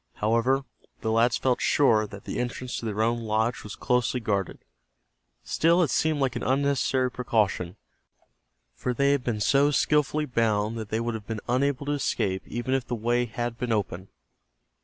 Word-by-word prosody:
However, 115 +5 +1 0.4
the 110 - -1
lads 115 +3 +3
felt 130 -2 +1
quite - - -7
sure 110 -7 +3
that 100 -1 -11
the - - -4
entrance 125 0 -3
to - - -7
their 110 0 0
own 120 +1 0
lodge 110 +2 0
was 105 - -7
closely 125 0 0
guarded. 100 -5 -2 0.9
Still 170 - +3
it 155 - 0
seemed 155 -2 +1
like 135 -2 0
an - - -3
unnecessary 130 -1 +1
precaution, 105 -7 0 1.0
for 125 - -3
they 140 +3 +3
had 140 -3 +1
been 115 -4 -2
so 140 +7 +3
skillfully 150 +1 +2
bound 110 -4 0
that 110 -2 -6
they 110 - -1
would 120 0 -2
have 110 -1 -7
been 110 -2 -3
unable 140 +2 0
to 145 - -1
escape 95 -9 -1
even 120 +2 -3
if 135 -2 0
the 120 - -2
way 120 +2 +1
had 120 0 -4
been 125 -1 -2
open. 95 -4 -2
120 Hz, 180 wpm, -26 LUFS, 110-135 Hz, 1.0 s, lads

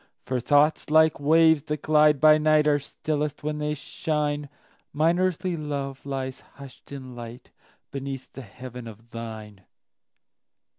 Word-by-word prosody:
For 130 -1 -2
thoughts, 145 +6 +2
like 160 0 +4
waves 160 +1 +5
that 150 0 -5
glide 150 -2 +4
by 155 +1 +6
night, 155 0 +4
Are 145 -1 +3
stillest 150 +1 -3
when 150 0 -2
they 150 0 -1
shine; 150 -1 -2 0.4
Mine 165 +4 +2
earthly 185 -1 0
love 140 -3 -5
lies 130 -1 -4
hush'd 140 -1 -13
in 130 -2 -8
lightBeneath 130 +3 -9
the 135 - -9
heaven 125 +2 -10
of 115 +1 -13
thine. 110 -3 -8
145 Hz, 135 wpm, -25 LUFS, 130-155 Hz, 0.4 s, by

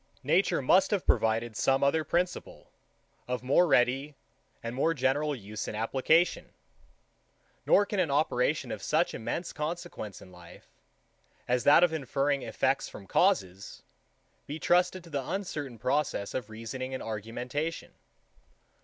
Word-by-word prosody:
Nature 165 +2 +2
must 185 +9 +4
have 205 -4 -1
provided 115 0 +1
some 135 +5 +2
other 155 +3 +2
principle, 175 +3 -3 0.6
of 125 0 -3
more 145 +7 +4
ready, 135 +2 +2 0.5
and 115 0 -4
more 165 +5 +1
general 145 +2 +1
use 105 -2 -6
and 105 - -4
application; 135 +9 +1 1.1
nor 205 - +5
can 205 -1 -3
an 175 -4 +2
operation 140 -3 +1
of - - -5
such - - +1
immense 165 +10 -4
consequence 155 - -5
in 90 - -14
life, 90 -1 -15 0.8
as 125 -1 0
that 150 +4 +7
of 175 -2 +3
inferring 140 -1 0
effects 135 +1 -1
from 100 - -11
causes, 95 - 0 0.6
be 150 - -5
trusted 180 +2 +2
to 170 - -14
the 140 -2 -2
uncertain 155 - -4
process 125 -4 -1
of 125 -4 -4
reasoning 120 +4 -6
and - - -6
argumentation. 120 +9 -4
135 Hz, 135 wpm, -29 LUFS, 120-165 Hz, 1.1 s, that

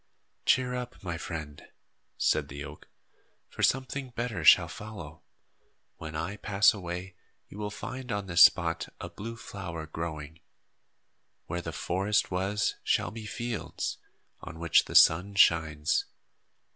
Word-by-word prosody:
"Cheer 125 -1 +3
up, 125 -3 -6
my 85 -3 -3
friend," 80 -3 -6 0.5
said - - +1
the 70 +2 -7
oak, 75 +1 -12 0.6
"for - - -8
something 130 0 +1
better 120 -7 -4
shall - - +7
follow. 90 -8 -9 0.8
When 80 -1 -7
I 85 +6 -3
pass 105 0 +4
away, 90 -1 -6 0.4
you 105 - -10
will 105 -1 -3
find 125 +4 -7
on 100 -1 -2
this 90 -2 +3
spot - - +5
a - - -6
blue 115 +3 -7
flower 85 -8 -7
growing. 80 -1 -6 1.1
Where 85 +1 -3
the 80 - -5
forest 95 +6 0
was 95 +3 0
shall - - +1
be 110 -1 -8
fields, 120 +1 -4 0.4
on - - -9
which 85 -1 +3
the - - -8
sun 90 +5 +6
shines. 80 -5 +3
95 Hz, 135 wpm, -29 LUFS, 80-105 Hz, 1.1 s, shall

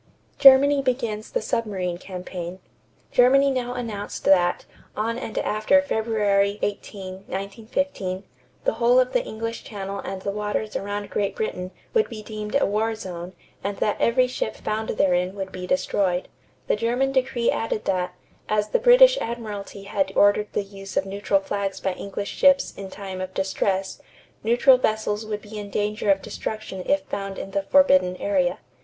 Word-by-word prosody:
=Germany 275 +1 +8
Begins 235 -5 -2
the - - -2
Submarine 190 -6 -2
Campaign.= 180 -1 -6 0.5
Germany 275 +3 +5
now 250 -1 -2
announced 220 -5 -5
that, 175 -2 +4 0.3
on 230 +3 -1
and 225 - -6
after 215 +7 +3
February 210 -5 +1
18, 195 -2 -5
1915, 200 -1 -3 0.4
the - - +1
whole 245 +2 +6
of 255 - +1
the - - +2
English 230 - -5
Channel 200 -2 -5
and 190 -1 -6
the 200 - -1
waters 210 +1 -3
around 205 0 -4
Great 200 -1 -1
Britain 185 -4 -3 0.2
would 450 -2 +2
be 215 -3 -7
deemed 210 +1 -5
a - - +2
war 220 +2 0
zone 180 -3 -7 0.3
and 200 0 -3
that 210 - +1
every 245 +2 +4
enemy - - +1
ship - - -3
found 215 +1 -3
therein 180 -1 +1
would 190 -1 -5
be 180 -1 -6
destroyed. 185 -8 0 0.4
The - - +2
German 240 +5 0
decree 255 -3 +1
added 225 -1 -2
that, 180 -1 -1 0.3
as 210 0 +1
the - - +2
British - - +7
admiralty 210 -4 -5
had 195 -1 -1
ordered 205 +1 +4
the 205 - 0
use 195 0 -9
of 190 - +2
neutral 195 0 0
flags 195 -1 -3
by 190 - -1
English 200 +2 -5
ships 275 -1 +3
in 195 -1 -7
time 190 -1 -7
of 185 0 -6
distress, 190 0 -1 0.4
neutral 245 +3 +5
vessels 215 -2 -1
would 210 -1 -4
be 215 0 -8
in 205 -1 -7
danger 210 +1 -1
of 195 -1 +3
destruction 215 -3 -5
if 290 0 +3
found 195 -6 -5
in 195 - -6
the 200 - 0
forbidden 185 -7 +4
area. 185 -3 +1
210 Hz, 165 wpm, -24 LUFS, 195-230 Hz, 0.5 s, =Germany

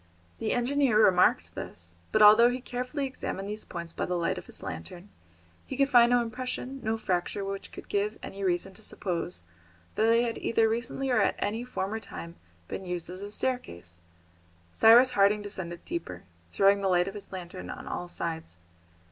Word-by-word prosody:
The - - 0
engineer 250 -1 +2
remarked 185 -4 +4
this; 85 0 -8 0.2
but 215 - +5
although 215 +3 +9
he 250 +1 -2
carefully 250 +3 -3
examined 200 -7 -5
these 210 +1 -4
points 170 -1 -7
by - - -2
the 180 - -1
light 170 - 0
of - - -14
his - - -9
lantern, 175 - -7 0.6
he 265 - -5
could 275 0 +3
find 240 -1 +7
no 245 0 +4
impression, 255 +3 -5
no 220 +1 -1
fracture 190 -1 -1
which 195 0 -5
could - - -10
give 205 +2 -1
any 195 0 -6
reason 185 +1 0
to 220 - -13
suppose 175 - -4 0.5
that 220 - +2
they 230 +1 +5
had 230 -1 -2
either 225 -1 +2
recently 240 +4 -2
or 245 - +4
at - - +2
any 220 +4 -2
former 220 -3 -3
time 170 -5 -9 0.3
been - - -5
used 180 -2 -4
as 185 +1 -8
a 205 - -6
staircase. 90 - -3 0.7
Cyrus 240 - +7
Harding 205 -1 +3
descended 180 -4 -6
deeper, 90 - -5 0.3
throwing 200 0 +4
the 195 - +1
light 180 0 +3
of 195 - -4
his 205 -2 -10
lantern 185 -1 -7
on - - -7
all 175 - -4
sides. 160 - -5
205 Hz, 185 wpm, -28 LUFS, 180-235 Hz, 0.7 s, although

